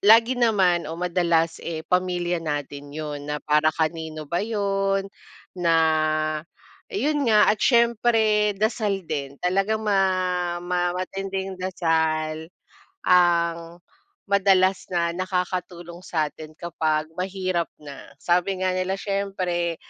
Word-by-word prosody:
lagi 230 Hz, +4 st, +5 dB
naman 185 Hz, -8 st, +3 dB
o 165 Hz, -, -5 dB
madalas, 170 Hz, -2 st, +1 dB
eh, 160 Hz, -1 st, -5 dB
pamilya 180 Hz, -1 st, 0 dB
natin 145 Hz, -2 st, -4 dB
yun, 150 Hz, -2 st, -5 dB
na 150 Hz, -, -1 dB
para 150 Hz, +1 st, +3 dB
kanino 160 Hz, -1 st, -2 dB
ba 170 Hz, +4 st, -2 dB
yun, 195 Hz, -2 st, 0 dB, 0.5 s
na 170 Hz, -2 st, +2 dB, 1.1 s
eh, 405 Hz, -5 st, -3 dB
yun 295 Hz, -3 st, 0 dB
nga 215 Hz, -1 st, +6 dB
at 215 Hz, -, -4 dB
siyempre 225 Hz, -3 st, +3 dB
dasal 210 Hz, -2 st, 0 dB
din. 140 Hz, -3 st, -4 dB
Talagang 195 Hz, +4 st, +1 dB
ma 185 Hz, -3 st, 0 dB
ma 175 Hz, 0 st, 0 dB
matinding 190 Hz, +1 st, -4 dB
dasal 160 Hz, -3 st, 0 dB, 0.6 s
ang 170 Hz, -1 st, +2 dB, 0.4 s
madalas 195 Hz, -1 st, +3 dB
na 170 Hz, -1 st, 0 dB
nakakatulong 180 Hz, -1 st, -3 dB
sa 155 Hz, -4 st, -1 dB
atin 155 Hz, 0 st, -12 dB
kapag 155 Hz, -2 st, -2 dB
mahirap 185 Hz, -2 st, -1 dB
na. 140 Hz, -3 st, -11 dB, 0.2 s
Sabi 180 Hz, +2 st, +1 dB
nga 185 Hz, -, +2 dB
nila, 185 Hz, +1 st, -1 dB
"Siyempre, 190 Hz, -4 st, -2 dB
180 Hz, 120 wpm, -24 LUFS, 165-195 Hz, 1.1 s, nga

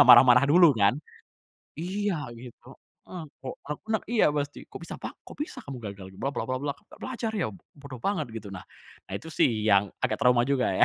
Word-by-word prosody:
marah-marah 125 Hz, +2 st, +9 dB
dulu 170 Hz, 0 st, +7 dB
kan. 100 Hz, +6 st, +5 dB, 0.8 s
Iya 180 Hz, -3 st, -2 dB
gitu, 120 Hz, 0 st, -12 dB, 0.4 s
eee, 180 Hz, -3 st, -6 dB, 0.2 s
kok 130 Hz, -, -6 dB
rek 150 Hz, 0 st, -5 dB
nek 220 Hz, -2 st, 0 dB
iya 230 Hz, -5 st, +3 dB
pasti, 145 Hz, -1 st, -3 dB
"Kok -, -, -10 dB
bisa -, -, -8 dB
pak -, -, -6 dB
kok -, -, -11 dB
bisa 300 Hz, -, -4 dB
kamu 130 Hz, -3 st, -7 dB
gagal 100 Hz, -3 st, -7 dB
bla 135 Hz, -, 0 dB
bla 140 Hz, -, -2 dB
bla, 140 Hz, +3 st, -2 dB
nggak -, -, -19 dB
belajar 235 Hz, -3 st, -3 dB
ya! 205 Hz, -6 st, 0 dB
B 105 Hz, -, -10 dB, 0.2 s
bodoh 140 Hz, -2 st, -10 dB
banget." 155 Hz, -, -1 dB
Gitu. 110 Hz, -3 st, -8 dB
Nah, 95 Hz, -, -6 dB, 0.5 s
ah -, -, -5 dB
itu 165 Hz, +1 st, -9 dB
sih 110 Hz, -7 st, +2 dB
yang 100 Hz, +1 st, +5 dB, 0.2 s
agak -, -, 0 dB
trauma 125 Hz, -3 st, +5 dB
juga 135 Hz, -1 st, +1 dB
ya. -, -, +6 dB
140 Hz, 205 wpm, -27 LUFS, 120-165 Hz, 0.8 s, marah-marah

